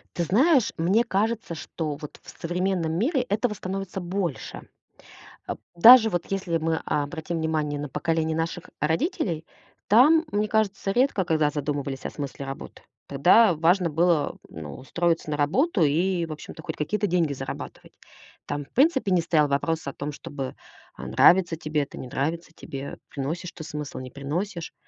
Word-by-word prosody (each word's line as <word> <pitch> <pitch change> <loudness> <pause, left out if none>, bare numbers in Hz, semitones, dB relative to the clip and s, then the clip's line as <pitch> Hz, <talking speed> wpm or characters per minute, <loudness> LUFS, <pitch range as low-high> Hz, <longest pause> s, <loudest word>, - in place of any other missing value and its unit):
Ты 175 - 0
знаешь, 255 - +3
мне 185 +8 +3
кажется, 215 -3 -1
что 155 -1 -4
вот 150 0 -10
в - - -12
современном 175 -1 -1
мире 255 - +1
этого 220 0 0
становится 195 -1 -5
больше. 175 -3 -4 0.8
Э, - - -1 0.2
даже 225 +5 +9
вот 175 -4 -2
если 190 -4 -1
мы 160 0 -1
обратим 160 +3 -2
внимание 155 -2 -1
на 145 -1 -5
поколение 160 +2 -1
наших 165 +1 -3
родителей, 165 - -1 0.4
там, 300 +10 +6
мне 210 +1 +1
кажется, 205 -2 0
редко 245 -3 +2
когда 155 -3 +2
задумывались 140 -2 -3
о - - -1
смысле 140 -1 -6
работы. 135 0 -8 0.3
Тогда 175 +8 +5
важно 170 +3 +3
было, 165 -1 +1
ну, 75 -3 -8
устроиться 165 +3 -1
на 150 - -1
работу 195 - +1
и, 170 +4 +2
в - - -8
общем-то, 155 +1 -8
хоть - - -5
какие-то 205 +7 -1
деньги 170 -5 +1
зарабатывать. 135 -1 -7 0.5
Там 145 -1 -4
в - - -30
принципе 265 - +3
не 180 -2 +4
стоял 160 -3 +2
вопрос 150 +2 -1
о 140 - -3
том, 145 +1 -5
чтобы, 135 -2 -6 0.4
э, - - -8
нравится 175 -2 +5
тебе 155 -2 -1
это, 140 - -10
не 130 - -7
нравится 160 +7 -3
тебе, 140 0 -7
приносишь 160 +6 -4
ты 160 - -9
смысл, 150 -2 -6
не 130 -1 -8
приносишь. 165 +6 -4
165 Hz, 160 wpm, -25 LUFS, 150-195 Hz, 0.8 s, даже